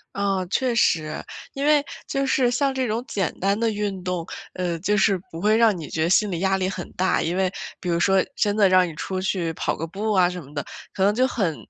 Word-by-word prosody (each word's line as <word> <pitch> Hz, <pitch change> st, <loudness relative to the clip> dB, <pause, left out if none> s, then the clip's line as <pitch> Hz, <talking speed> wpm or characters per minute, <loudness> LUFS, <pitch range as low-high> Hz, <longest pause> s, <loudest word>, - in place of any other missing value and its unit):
啊， 195 Hz, -2 st, 0 dB
确 255 Hz, +2 st, +1 dB
实。 155 Hz, -8 st, +1 dB, 0.3 s
因 275 Hz, +1 st, -2 dB
为 295 Hz, -1 st, +4 dB, 0.2 s
就 275 Hz, 0 st, -1 dB
是 260 Hz, -2 st, +2 dB
像 270 Hz, +2 st, +1 dB
这 260 Hz, -2 st, -1 dB
种 225 Hz, +3 st, -2 dB
简 195 Hz, -5 st, -1 dB
单 200 Hz, +3 st, +1 dB
的 230 Hz, -, +2 dB
运 205 Hz, -3 st, -3 dB
动， 180 Hz, -2 st, -2 dB, 0.3 s
呃， 175 Hz, -2 st, -2 dB
就 210 Hz, +4 st, +1 dB
是 195 Hz, -1 st, +3 dB
不 165 Hz, -, -7 dB
会 210 Hz, +2 st, +4 dB
让 225 Hz, -4 st, +4 dB
你 160 Hz, -3 st, -7 dB
觉 160 Hz, -, -1 dB
得 165 Hz, -, +1 dB
心 205 Hz, +2 st, +3 dB
理 170 Hz, -, -2 dB
压 190 Hz, +1 st, +2 dB
力 185 Hz, -, 0 dB
很 185 Hz, -2 st, -6 dB
大， 185 Hz, +1 st, +1 dB
因 170 Hz, +2 st, -1 dB
为 190 Hz, -1 st, +1 dB, 0.3 s
比 180 Hz, -, -4 dB
如 170 Hz, 0 st, +1 dB
说 190 Hz, +1 st, +3 dB
真 205 Hz, -1 st, +1 dB
的 210 Hz, -2 st, +5 dB
让 185 Hz, -1 st, +5 dB
你 165 Hz, -, -7 dB
出 185 Hz, +3 st, -3 dB
去 180 Hz, -4 st, -1 dB
跑 -, -, -1 dB
个 165 Hz, -, -4 dB
步 205 Hz, +6 st, -3 dB
啊 180 Hz, -3 st, +4 dB
什 180 Hz, 0 st, -6 dB
么 140 Hz, +1 st, -15 dB
的， 145 Hz, -1 st, -3 dB, 0.3 s
可 190 Hz, -, 0 dB
能 200 Hz, +1 st, +4 dB
就 255 Hz, +4 st, +2 dB
很 195 Hz, -11 st, -1 dB
195 Hz, 265 characters per minute, -23 LUFS, 180-215 Hz, 0.3 s, 的